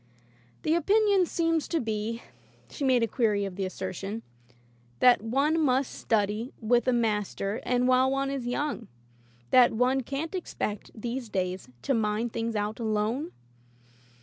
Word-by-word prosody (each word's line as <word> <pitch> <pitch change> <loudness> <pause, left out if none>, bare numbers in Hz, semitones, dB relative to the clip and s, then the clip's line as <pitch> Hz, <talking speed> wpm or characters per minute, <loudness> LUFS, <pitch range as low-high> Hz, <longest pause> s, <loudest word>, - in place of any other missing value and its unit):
"The 310 - +2
opinion 400 +1 +3
seems 330 -2 0
to 335 - 0
be," 225 0 -3 0.5
she 290 - -5
made 255 -3 +3
a - - +2
query 210 -3 +1
of 190 -2 -6
the 195 -1 -2
assertion, 195 +4 -5 0.7
"that 245 - +5
one 275 +8 +1
must 265 -2 +2
study 215 +2 0
with 240 +1 +2
a - - +5
master 210 -3 -1
and 250 0 +1
while 255 +1 +4
one 275 0 0
is 265 -3 -3
young; 245 -3 -2 0.6
that 250 -2 +6
one 250 +4 +2
can't 280 +7 -4
expect, 215 - -4
these 240 +1 -4
days, 185 -5 -3
to - - +1
mine 220 0 0
things 230 0 -2
out 210 +2 -2
alone?" 225 +7 -1
240 Hz, 150 wpm, -28 LUFS, 215-275 Hz, 0.7 s, that